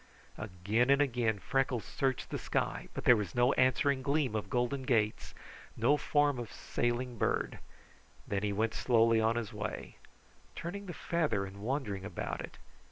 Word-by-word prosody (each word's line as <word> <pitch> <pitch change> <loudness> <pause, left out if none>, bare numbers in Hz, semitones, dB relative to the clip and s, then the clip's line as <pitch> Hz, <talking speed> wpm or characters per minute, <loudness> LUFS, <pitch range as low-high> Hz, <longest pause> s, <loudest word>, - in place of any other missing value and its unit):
Again 105 +5 0
and 140 0 +5
again 120 -6 +1
Freckles 130 +2 0
searched 135 -2 -1
the - - -2
sky, - - -2
but - - -4
there 125 - +7
was 105 -6 -3
no 120 +2 +4
answering 130 +2 +3
gleam 140 -3 +1
of 105 - -3
golden 125 +2 0
gates, 115 -5 0 0.4
no 125 +6 +4
form 145 -2 +2
of 120 -3 -6
sailing 120 0 -2
bird; - - 0 0.7
then 100 -1 -1
he 105 -1 0
went 110 +3 0
slowly 115 -2 +3
on 110 +1 +2
his 115 -1 -3
way, 105 -1 -5 0.6
turning 200 +4 -5
the 175 - -5
feather 135 -13 0
and 100 +1 -10
wondering 110 -5 -2
about 105 - -4
it. - - -9
120 Hz, 165 wpm, -32 LUFS, 110-135 Hz, 0.7 s, there